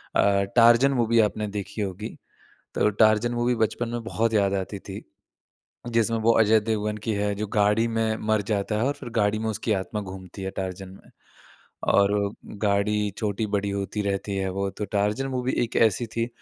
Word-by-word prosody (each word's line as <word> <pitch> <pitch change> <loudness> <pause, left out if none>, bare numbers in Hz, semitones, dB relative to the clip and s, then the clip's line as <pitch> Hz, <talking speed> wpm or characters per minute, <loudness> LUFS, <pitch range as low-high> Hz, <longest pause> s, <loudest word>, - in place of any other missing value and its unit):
अ, 100 -1 +3
Tarzan 120 +3 +6
movie 115 -3 +2
आपने 105 0 +1
देखी 105 +1 -5
होगी, 100 +2 -4 0.7
तो - - +3
टार्ज़न 110 +3 +3
मूवी 120 +1 +1
बचपन 120 +2 -3
में 120 0 -4
बहुत 115 0 0
याद 100 -2 +2
आती 100 +1 -3
थी। - - -8 0.9
जिसमें 115 0 +2
वो 115 +1 +3
अजय 110 0 +5
देवगन 105 -1 -2
की - - +2
है 100 0 0
जो 105 +2 -3
गाड़ी 105 +2 +3
में 115 -1 0
मर 110 -1 +3
जाता 105 +1 -1
है 110 - 0
और 140 - +2
फिर 130 - -7
गाड़ी 105 0 +2
में 110 0 -2
उसकी 110 +1 -2
आत्मा 100 +2 -2
घूमती 95 -1 -9
है, 95 - -3
टार्ज़न 95 0 -5
में 95 - -16 0.8
और 100 0 +2 0.3
गाड़ी 105 +1 +1
छोटी-बड़ी 100 -1 -1
होती 100 +1 -3
रहती 100 0 -2
है 95 0 -1
वो, 100 +1 -2
तो 105 - -5
टार्ज़न 105 +5 0
मूवी 130 -1 -2
एक 115 - -3
ऐसी 115 +1 +3
थी 115 +1 -2
105 Hz, 185 wpm, -25 LUFS, 100-115 Hz, 0.9 s, टार्ज़न